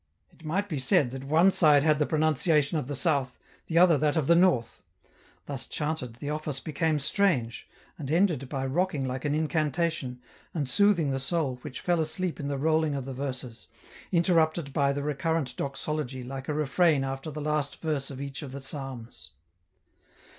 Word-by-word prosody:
It - - -21
might 190 +6 -1
be 155 -8 -3
said 135 -1 +3
that 135 +1 -7
one 165 +7 +5
side 150 -6 +5
had 155 -1 +3
the 150 - +2
pronunciation 155 -1 +2
of 125 - -5
the 145 - -3
South, 135 -3 0 0.3
the 165 - -1
other 170 -4 +6
that 150 0 +1
of 160 -4 +1
the 170 - +5
North; 170 -10 +2 0.6
thus 140 -4 -5
chanted, 150 -6 -3
the 145 +5 -5
office 150 -3 -3
became 155 +2 0
strange, 140 - 0 0.3
and 140 -4 -5
ended 160 -6 +1
by 135 -2 -2
rocking 150 0 0
like 130 +1 -4
an 145 0 +1
incantation, 155 -4 -1 0.4
and 145 -5 -1
soothing 170 0 +3
the 135 - -1
soul 135 -3 -1
which 140 -2 -7
fell 175 -2 +1
asleep 165 +3 -1
in 140 - -3
the 140 -1 -2
rolling 155 +1 +1
of 135 -2 -4
the 135 - -5
verses, 130 -3 -6 0.4
interrupted 165 -4 +2
by 140 0 +2
the 140 0 -3
recurrent 150 -2 -1
doxology 140 -2 -3
like 135 +2 -7
a - - 0
refrain 150 0 +2
after 135 +3 -4
the 150 0 -6
last 150 -1 -2
verse 150 -4 -2
of 135 -2 -8
each 140 +1 -6
of 135 -3 -8
the 140 - -5
psalms. 135 -4 -7
150 Hz, 185 wpm, -28 LUFS, 135-160 Hz, 0.6 s, other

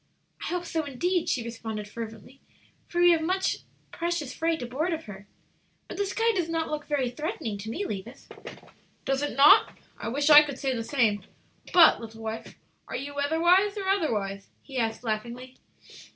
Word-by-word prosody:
"I - - -5
hope 355 0 -2
so, 325 -1 -2
indeed," 335 +6 -1
she 245 - 0
responded, 225 -2 -6
fervently, 225 +4 -9 0.5
"for 345 - -3
we 350 0 +7
have 330 -2 +3
much 375 +4 0 0.3
precious 340 -5 -3
freight 325 -3 -1
aboard 290 +9 -2
of 320 0 -4
her. 200 -2 -11 0.6
But - - -8
the 405 0 0
sky 455 +4 +1
does 355 -5 -1
not 325 -1 -2
look 300 -1 -4
very 270 -5 0
threatening 245 - -4
to 215 +3 -6
me, 395 - -3
Levis." 230 - -7 0.8
"Does 270 0 0
it 290 - -3
not? 280 +2 +6 0.2
I 225 - -5
wish 285 +6 +1
I 295 0 +11
could 285 -3 -4
say 270 -1 -1
the 230 - -3
same. 225 -6 +1 0.5
But, 345 -8 +7
little 225 0 -10
wife, 220 0 -6 0.3
are - - -5
you 280 +3 -6
weatherwise 345 +8 +3
or 390 -2 -3
otherwise?" 210 - -1 0.2
he 265 -3 -5
asked, 225 0 -2
laughingly. 240 +3 -4
280 Hz, 180 wpm, -27 LUFS, 230-330 Hz, 0.8 s, I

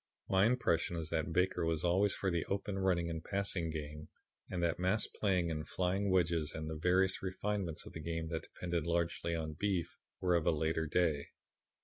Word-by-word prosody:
"My 95 +2 +4
impression 85 -9 +1
is 80 -2 -4
that 80 -1 0
Baker 90 0 +2
was 80 -1 0
always 95 +3 +3
for 95 - 0
the 85 -2 +1
open 100 0 -2
running 90 -3 +2
and 80 -1 -4
passing 100 -4 -1
game 75 -1 -6 0.4
and 90 -2 -2
that 85 0 +1
mass 95 +4 +2
playing 90 -5 0
and 75 -1 -4
flying 95 +2 0
wedges 85 -4 +2
and 80 0 -4
the 80 - -3
various 90 +4 +2
refinements 95 -2 -2
of - - -10
the - - -6
game 80 +1 -3
that 80 -1 -2
depended 85 -2 -2
largely 85 0 0
on 80 -1 -3
'beef' 90 0 -1 0.2
were 90 -1 +2
of 85 -2 +2
a - - +6
later 80 0 0
day. 75 -3 +1
85 Hz, 195 wpm, -35 LUFS, 80-95 Hz, 0.4 s, a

